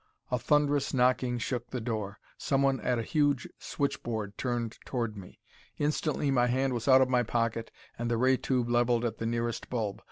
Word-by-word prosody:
A 125 - +1
thunderous 145 +3 +2
knocking 125 -1 +2
shook 120 0 -3
the 125 - -3
door. 110 -3 -3 0.2
Someone 135 -1 +1
at 125 -1 0
a 115 - -1
huge 145 0 +1
switchboard 110 -7 -3
turned 120 -3 -3
toward 115 -4 -3
me. 95 -3 -11 0.4
Instantly 150 -1 0
my 125 -2 +3
hand 130 +2 +1
was 120 +1 -3
out 130 -1 +7
of 130 - +4
my 125 -1 +3
pocket, 115 -1 -1 0.3
and 120 0 -1
the 120 - +1
ray 130 +2 +4
tube 125 -2 0
leveled 120 0 +2
at 115 -2 -3
the 115 - -2
nearest 115 0 -2
bulb. 110 -5 -2
120 Hz, 185 wpm, -29 LUFS, 115-130 Hz, 0.4 s, out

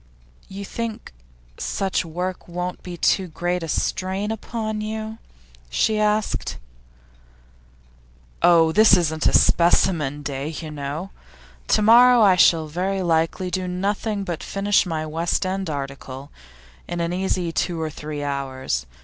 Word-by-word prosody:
'You 200 +1 -7
think 230 - -5 0.5
such 195 -1 -1
work 180 +2 -5
won't 180 +1 -4
be 175 -1 -8
too 190 +2 +2
great 175 +2 -2
a 165 - -4
strain 190 +6 -1
upon 220 -1 -4
you?' 220 +1 -5 0.5
she 215 - +1
asked. 210 0 0 1.8
'Oh, 165 -2 +5
this 210 +1 +6
isn't 160 -3 0
a - - +2
specimen 160 -4 +3
day, 140 -1 -4
you 160 0 -6
know. 150 +6 -5 0.6
To 215 - +3
morrow 240 +2 +7
I 195 -3 +6
shall 165 -2 +5
very 185 +5 -2
likely 165 +2 0
do 185 0 -2
nothing 200 +3 -2
but 175 -4 -4
finish 200 0 +1
my 160 -2 -2
West 165 +4 -1
End 190 -1 -2
article, 140 -1 -6 0.6
in 175 0 -4
an 170 +1 -1
easy 185 -2 -1
two 165 +1 -1
or 160 -1 -3
three 150 0 -6
hours. 130 - -3
180 Hz, 135 wpm, -22 LUFS, 155-195 Hz, 1.8 s, morrow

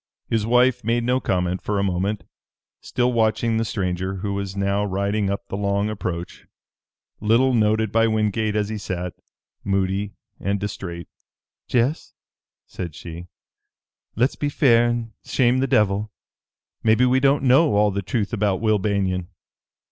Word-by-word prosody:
His 110 -1 0
wife 125 +1 +3
made 115 +2 +1
no 125 +2 +2
comment 90 -4 -1
for 105 - -2
a 100 - +1
moment, 95 +2 -1 0.6
still 125 0 0
watching 115 0 +1
the 115 - +1
stranger, 95 -3 -2
who 100 +1 -3
was 100 -1 -4
now 100 +1 +1
riding 100 +1 -1
up 100 - -3
the - - -5
long 100 +1 0
approach, 90 -4 -5 0.7
little 115 +5 +3
noted 110 -1 +2
by 115 0 +3
Wingate 110 0 0
as 105 -1 0
he 110 -1 -4
sat, 90 -2 -4 0.5
moody 100 +1 -1 0.2
and 100 +1 -1
distrait. 90 -4 -5 0.6
"Jess," 125 +5 0 0.5
said 85 -5 -7
she, 85 +1 -9 0.9
"let's 125 +5 +1
be 145 - -1
fair 120 -5 +4
and 120 -1 -3
shame 125 0 +2
the 135 - +1
devil. 105 -2 +1 0.7
Maybe 110 +3 +4
we 130 +1 +3
don't 140 +1 +3
know 135 0 +4
all 105 0 +3
the 100 +1 -2
truth 105 +3 -2
about 100 -3 +1
Will 110 -2 +2
Banion. 95 -3 -1
105 Hz, 150 wpm, -23 LUFS, 100-115 Hz, 0.9 s, fair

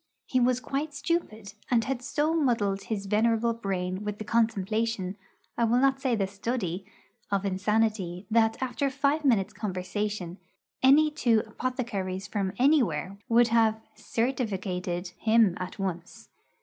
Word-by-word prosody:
He 255 - +1
was 250 0 +3
quite 285 +4 -3
stupid, 255 - -2 0.2
and 235 -2 +3
had 260 0 -2
so 295 +4 0
muddled 220 -10 +1
his 205 -3 -3
venerable 225 +3 +2
brain 190 -3 -3
with 210 0 -4
the 215 - -5
contemplation 220 -2 0 0.4
I 235 - +4
will 230 +2 +3
not 270 +1 +3
say 255 -3 +1
the 200 -3 +1
study 195 -2 -3 0.4
of 200 -1 0
insanity, 200 -2 0
that, 225 0 +3
after 260 +2 -1
five 285 +3 0
minutes' 230 -9 +2
conversation, 190 -1 -3 0.4
any 295 +4 +6
two 235 -7 +2
apothecaries 215 -6 -3
from 195 -3 -2
anywhere 200 - +2
would 235 +1 +5
have 225 -1 +3
'certificated' 190 -7 -2
him 220 -4 +4
at 185 0 -6
once. 180 -4 -5
220 Hz, 135 wpm, -28 LUFS, 195-250 Hz, 0.4 s, any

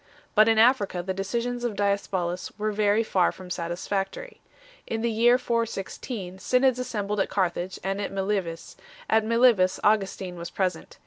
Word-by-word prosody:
But 215 0 +6
in 225 -1 +4
Africa 220 -6 +3
the 190 +1 -2
decisions 235 +6 -3
of 235 -4 -2
Diospolis 190 -3 -1
were 215 0 -1
very 210 +1 +2
far 185 -5 +2
from 185 -1 -11
satisfactory. 195 - -4 0.5
In 225 0 -2
the 235 - +1
year 240 +3 +4
416 225 -4 -3
synods 255 +4 +2
assembled 210 -4 -2
at 195 - +1
Carthage 185 -1 -1
and 195 +2 -2
at 200 - -3
Mile 195 +1 0
vis; 165 -2 -9 0.3
at 220 0 +3
Milevis 230 -5 +3
Augustin 195 -3 +1
was 170 0 -6
present. 180 -3 -3
205 Hz, 155 wpm, -26 LUFS, 185-230 Hz, 0.5 s, But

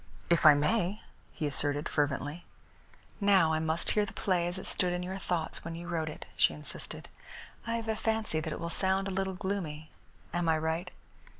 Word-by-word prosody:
"If 170 -2 +6
I 150 - +10
may," 185 +6 +1 0.3
he 155 - -3
assented 145 +1 0
fervently. 145 +2 -1 0.8
"Now 190 -6 +5
I 155 - +2
must 160 +1 0
hear 210 - +3
the 205 - -5
play 180 -3 +1
as 175 +2 -3
it 190 - -6
stood 180 -1 +1
in 180 0 -2
your 190 +2 -4
thoughts 170 -4 -2
when 165 0 -5
you 170 +1 -7
wrote 160 -3 -1
it," 155 - -8
she - - +4
insisted. 150 - -4 0.6
"I 230 - 0
have 230 -1 -3
a 220 - +1
fancy 220 -7 0
that 155 0 -3
it - - -4
will 170 0 -3
sound 190 +2 +2
a - - -2
little 190 0 -1
gloomy. 175 -6 -3 0.4
Am 175 -1 +1
I 160 - +4
right?" 160 +3 -1
170 Hz, 200 wpm, -31 LUFS, 155-190 Hz, 0.8 s, I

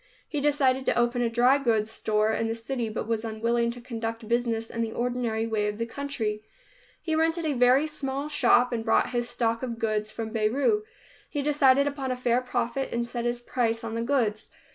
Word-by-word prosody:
He 295 - -3
decided 275 -3 +2
to - - +2
open 240 +1 +2
a 235 - +1
dry 245 +4 +4
goods 220 -5 +1
store 215 0 +1
in 225 - 0
the 225 - -2
city, 230 0 -3
but 215 0 -4
was 225 -1 -1
unwilling 230 +1 0
to 240 +1 -6
conduct 230 -2 -5
business 230 -1 0
in 230 - -3
the 225 -1 -1
ordinary 240 -2 -1
way 215 -2 0
of 210 0 -3
the 230 - -1
country. 230 -5 -3 0.6
He 320 - -3
rented 325 +1 +1
a 305 - +1
very 255 +3 +4
small 280 -2 -3
shop 250 -4 +3
and 225 -1 -2
brought 225 - +2
his 240 -1 -1
stock 230 -1 0
of 240 -3 -4
goods 215 -1 -1
from 225 -1 -5
Beirut. 270 - +1 0.4
He 290 -2 -2
decided 280 -2 +4
upon 280 -2 -3
a 255 - 0
fair 250 0 +1
profit, 250 +1 -2
and 235 0 -1
set 235 0 -4
his 240 0 -1
price 230 -2 -1
on 225 -1 -4
the 230 - -2
goods. 230 -4 0
240 Hz, 210 wpm, -27 LUFS, 225-265 Hz, 0.6 s, dry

